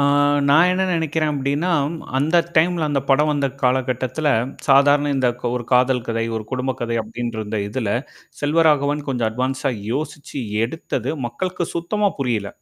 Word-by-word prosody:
ஆ -, -, +3 dB, 0.5 s
நான் 160 Hz, +5 st, +6 dB
என்ன 190 Hz, +1 st, 0 dB
நினைக்கிறேன் 155 Hz, -1 st, 0 dB
அப்டின்னா, 140 Hz, +6 st, -1 dB, 0.5 s
அந்த 155 Hz, +5 st, +2 dB, 0.2 s
டைம்ல 165 Hz, 0 st, +3 dB
அந்த 140 Hz, -, +1 dB
படம் 150 Hz, +3 st, +4 dB
வந்த 140 Hz, -1 st, 0 dB, 0.2 s
காலகட்டத்தில 130 Hz, +3 st, 0 dB, 0.4 s
சாதாரண 145 Hz, +1 st, +5 dB
இந்த 130 Hz, -2 st, +2 dB, 0.3 s
ஒரு 120 Hz, -1 st, -3 dB
காதல் 125 Hz, -1 st, +3 dB
கதை, 115 Hz, 0 st, 0 dB
ஒரு 110 Hz, -, -4 dB
குடும்ப 130 Hz, +1 st, -1 dB
கதை 115 Hz, -1 st, -1 dB
அப்டின்கின்ற 115 Hz, +1 st, -5 dB
இருந்த 105 Hz, 0 st, -3 dB
இதுல 110 Hz, -2 st, -2 dB, 0.5 s
செல்வராகவன் 150 Hz, -1 st, +2 dB
கொஞ்சம் 120 Hz, -4 st, 0 dB
அட்வான்ஸா 130 Hz, +4 st, -1 dB
இப்ப 100 Hz, -, -9 dB
யோசிச்சு 145 Hz, -1 st, -5 dB, 0.3 s
எடுத்தது 130 Hz, -2 st, -3 dB, 0.2 s
மக்களுக்கு 180 Hz, +9 st, -3 dB
சுத்தமா 205 Hz, +5 st, 0 dB
புரியல. 115 Hz, -7 st, -1 dB
135 Hz, 145 wpm, -21 LUFS, 125-155 Hz, 0.5 s, நான்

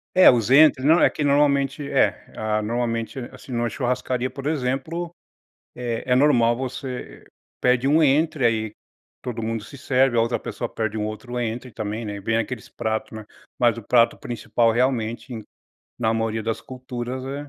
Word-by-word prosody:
É 185 Hz, -, +9 dB
os 120 Hz, -1 st, +2 dB
entry 140 Hz, -2 st, +6 dB
não, 160 Hz, +4 st, +6 dB
é -, -, +6 dB
que 150 Hz, -, -4 dB
normalmente, 140 Hz, 0 st, +2 dB
é. -, -, +2 dB
Ah, 110 Hz, 0 st, 0 dB
normalmente, 115 Hz, +1 st, -2 dB
assim, -, -, -13 dB
numa 120 Hz, -1 st, 0 dB
churrascaria, 125 Hz, 0 st, -1 dB
por 135 Hz, 0 st, -9 dB
exemplo, 155 Hz, +4 st, -2 dB, 0.6 s
é 120 Hz, -2 st, -3 dB
é -, -, +6 dB
normal 125 Hz, -4 st, +4 dB
você 130 Hz, 0 st, -6 dB, 0.3 s
pede 125 Hz, +1 st, +2 dB
um 155 Hz, +3 st, +4 dB
entry 150 Hz, 0 st, +2 dB
aí, 110 Hz, -2 st, +1 dB, 0.5 s
todo 120 Hz, -3 st, -4 dB
mundo 115 Hz, -1 st, -3 dB
se 140 Hz, -, -12 dB
serve, 130 Hz, -1 st, +2 dB
a -, -, +5 dB
outra 115 Hz, +1 st, +1 dB
pessoa 120 Hz, -, -5 dB
pede 110 Hz, -1 st, -3 dB
um 105 Hz, -, -1 dB
outro 120 Hz, +3 st, -5 dB
entry 120 Hz, +2 st, -4 dB
também, 110 Hz, +2 st, -4 dB
né, 105 Hz, -1 st, -5 dB
e -, -, -7 dB
vem 110 Hz, +3 st, 0 dB
aqueles 115 Hz, -1 st, -3 dB
pratos, 110 Hz, 0 st, -3 dB
né. 110 Hz, -, -8 dB, 0.3 s
Mas 120 Hz, -1 st, +3 dB
o -, -, -7 dB
prato 115 Hz, +2 st, +3 dB
principal, 115 Hz, -1 st, 0 dB
realmente, 120 Hz, 0 st, -1 dB
em 110 Hz, -2 st, -6 dB, 0.5 s
na 115 Hz, -2 st, +1 dB
maioria 110 Hz, 0 st, -1 dB
das 115 Hz, 0 st, -2 dB
culturas, 130 Hz, 0 st, -6 dB
é 140 Hz, +2 st, -6 dB
120 Hz, 180 wpm, -23 LUFS, 115-135 Hz, 0.6 s, É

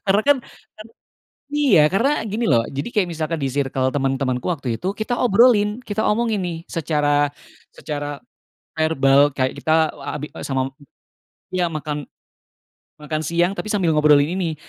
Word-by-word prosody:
Karena 195 Hz, +2 st, +4 dB
kan 285 Hz, -1 st, +4 dB, 0.4 s
kan 215 Hz, -, -10 dB, 0.7 s
iya. 240 Hz, -, +5 dB
Karena 230 Hz, +8 st, +2 dB, 0.2 s
gini 220 Hz, +3 st, -2 dB
loh, 115 Hz, 0 st, +3 dB
jadi 140 Hz, -, -4 dB
kayak 200 Hz, -6 st, +1 dB
misalkan 165 Hz, 0 st, -3 dB
di 135 Hz, -, -1 dB
sirkel 135 Hz, -1 st, -1 dB
teman-temanku 135 Hz, -2 st, -1 dB
waktu 135 Hz, -8 st, -2 dB
itu 185 Hz, +11 st, -3 dB
kita 215 Hz, +3 st, -3 dB
obrolin, 220 Hz, -1 st, +4 dB
kita 210 Hz, +1 st, -2 dB
omongin 220 Hz, -2 st, +1 dB
nih 175 Hz, -2 st, -3 dB
secara 145 Hz, -3 st, +1 dB, 0.4 s
secara 145 Hz, -1 st, -5 dB, 0.6 s
verbal, 145 Hz, -2 st, +3 dB
kayak 130 Hz, -1 st, -1 dB
kita, 155 Hz, -, +1 dB, 0.2 s
eee, 145 Hz, -1 st, -7 dB
abi 150 Hz, -, -5 dB, 0.2 s
sama 135 Hz, -1 st, -1 dB, 0.9 s
iya, 180 Hz, -2 st, +1 dB
makan 150 Hz, -2 st, -4 dB, 0.9 s
makan 155 Hz, +1 st, -4 dB
siang, 170 Hz, +4 st, +1 dB
tapi -, -, -4 dB
sambil 195 Hz, -6 st, +1 dB
ngobrolin 150 Hz, 0 st, +4 dB
ini. 165 Hz, -4 st, -1 dB
155 Hz, 145 wpm, -21 LUFS, 145-200 Hz, 0.9 s, iya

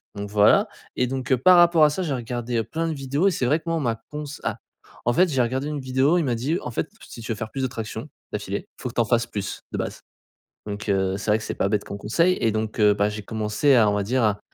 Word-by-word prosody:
donc 100 Hz, 0 st, -5 dB
voilà 105 Hz, 0 st, +5 dB, 0.3 s
et 125 Hz, -, +3 dB
donc, 130 Hz, +1 st, -4 dB
heu, 130 Hz, -, +5 dB
par 180 Hz, +8 st, +6 dB
rapport 170 Hz, -2 st, +6 dB
à -, -, +5 dB
ça, 185 Hz, -, -3 dB
j'ai 150 Hz, -5 st, -1 dB
regardé, 120 Hz, 0 st, -3 dB
heu, 115 Hz, -, +1 dB
plein 165 Hz, +6 st, -2 dB
de -, -, -1 dB
vidéos 140 Hz, +7 st, 0 dB
et -, -, +4 dB
c'est 130 Hz, -7 st, -1 dB
vrai 150 Hz, +5 st, +3 dB
que -, -, -29 dB
moi 165 Hz, -, +1 dB
on -, -, -2 dB
m'a 115 Hz, -3 st, -1 dB
cons 150 Hz, 0 st, -4 dB, 0.2 s
ah, -, -, -2 dB, 0.5 s
en 120 Hz, -, +3 dB
fait, 180 Hz, +4 st, +4 dB
j'ai 135 Hz, -3 st, +1 dB
regardé 130 Hz, +4 st, -1 dB
une 150 Hz, -1 st, -3 dB
vidéo, 130 Hz, +6 st, +2 dB
il 170 Hz, -, +2 dB
m'a 125 Hz, -, 0 dB
dit: 140 Hz, +9 st, -1 dB
«En 125 Hz, -, -5 dB
fait, -, -, -2 dB, 0.2 s
si -, -, -9 dB
tu 115 Hz, +1 st, -5 dB
veux -, -, -1 dB
faire 110 Hz, 0 st, -5 dB
plus 135 Hz, -, -4 dB
de 130 Hz, -, +2 dB
tractions 115 Hz, +3 st, -6 dB, 0.2 s
d'affilée, 100 Hz, -1 st, -3 dB
il -, -, -19 dB
faut 125 Hz, -, -3 dB
que -, -, -13 dB
tu 120 Hz, -, +3 dB
en -, -, +1 dB
fasses 120 Hz, +1 st, +1 dB
plus 100 Hz, -4 st, -5 dB
de -, -, -3 dB
base» -, -, -4 dB, 0.7 s
Donc, 105 Hz, +1 st, -5 dB
heu, 95 Hz, -1 st, +1 dB
c'est 105 Hz, -, -4 dB
vrai 110 Hz, -, +4 dB
que 110 Hz, -, -8 dB
c'est -, -, -3 dB
pas 100 Hz, -, 0 dB
bête 105 Hz, -1 st, 0 dB
comme 100 Hz, -, -6 dB
conseil, 170 Hz, -, +2 dB
et 115 Hz, -2 st, +3 dB
donc, 110 Hz, 0 st, -3 dB
heu, 105 Hz, -1 st, +6 dB
bah, 100 Hz, +1 st, +1 dB
j'ai 105 Hz, 0 st, -5 dB
commencé 110 Hz, +6 st, +1 dB
à, 110 Hz, -4 st, +5 dB
on 105 Hz, -, +1 dB
va 105 Hz, -, 0 dB
dire, 125 Hz, +4 st, +1 dB
à 105 Hz, -1 st, +2 dB
120 Hz, 300 wpm, -24 LUFS, 105-140 Hz, 0.7 s, par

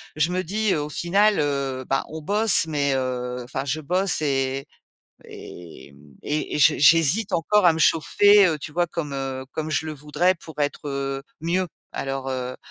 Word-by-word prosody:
je 155 Hz, +3 st, +1 dB
me 185 Hz, +1 st, -1 dB
dis 210 Hz, +2 st, -1 dB
au 150 Hz, 0 st, -3 dB
final, 200 Hz, +6 st, +1 dB
heu, 140 Hz, -3 st, -2 dB
bah 135 Hz, -, +1 dB
on 160 Hz, 0 st, -7 dB
bosse, 205 Hz, -1 st, +4 dB
mais, 140 Hz, -3 st, 0 dB
heu, 125 Hz, -1 st, -3 dB
enfin 135 Hz, +2 st, -5 dB
je 150 Hz, +3 st, -2 dB
bosse 180 Hz, +2 st, +1 dB
et 135 Hz, -1 st, -1 dB, 0.6 s
et 80 Hz, -5 st, -12 dB, 0.6 s
j'hé 150 Hz, -, +4 dB
j'hésite 165 Hz, +7 st, +4 dB
encore 190 Hz, +4 st, +2 dB
à -, -, +7 dB
me 160 Hz, -, -5 dB
chauffer, 200 Hz, +5 st, +4 dB
heu, 160 Hz, -2 st, -1 dB
tu 150 Hz, -, -8 dB
vois, 175 Hz, 0 st, +1 dB
comme 150 Hz, -4 st, -5 dB, 0.4 s
comme 155 Hz, 0 st, -4 dB
je 160 Hz, +1 st, -1 dB
le 155 Hz, -, -5 dB
voudrais 150 Hz, +6 st, 0 dB
pour 160 Hz, -2 st, -13 dB
être, 145 Hz, 0 st, -2 dB
heu, 135 Hz, 0 st, -4 dB, 0.2 s
mieux. 180 Hz, +2 st, -1 dB, 0.3 s
Alors, 135 Hz, 0 st, -4 dB
heu, 130 Hz, -1 st, -4 dB
150 Hz, 170 wpm, -23 LUFS, 135-175 Hz, 0.6 s, à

